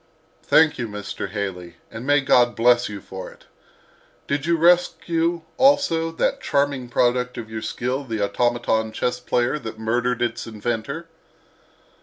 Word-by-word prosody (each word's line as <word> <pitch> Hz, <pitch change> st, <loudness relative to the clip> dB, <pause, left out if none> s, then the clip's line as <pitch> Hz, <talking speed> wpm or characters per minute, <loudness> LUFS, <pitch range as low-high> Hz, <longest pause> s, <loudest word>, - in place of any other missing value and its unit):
"Thank 160 Hz, -3 st, +4 dB
you, 120 Hz, -, -2 dB
Mr. 105 Hz, -1 st, -6 dB
Haley, 95 Hz, -4 st, -5 dB, 0.2 s
and 115 Hz, +4 st, -7 dB
may 145 Hz, 0 st, +4 dB
God 120 Hz, -2 st, +3 dB
bless 120 Hz, 0 st, +3 dB
you 105 Hz, -1 st, -7 dB
for 95 Hz, 0 st, -8 dB
it. -, -, -19 dB, 0.8 s
Did 145 Hz, +2 st, -2 dB
you 170 Hz, 0 st, +3 dB
rescue, 170 Hz, 0 st, +2 dB
also, 265 Hz, -13 st, +3 dB
that -, -, 0 dB
charming 140 Hz, -3 st, 0 dB
product 125 Hz, +1 st, +1 dB
of 110 Hz, -2 st, -7 dB
your 110 Hz, 0 st, -4 dB
skill, 125 Hz, +5 st, -3 dB
the 115 Hz, -4 st, -4 dB
automaton 120 Hz, 0 st, 0 dB
chess 125 Hz, +2 st, -1 dB
player 125 Hz, +5 st, 0 dB
that 110 Hz, -4 st, -7 dB
murdered 120 Hz, +2 st, 0 dB
its 120 Hz, -1 st, -3 dB
inventor?" 120 Hz, +8 st, -4 dB
125 Hz, 145 wpm, -22 LUFS, 110-145 Hz, 0.8 s, Thank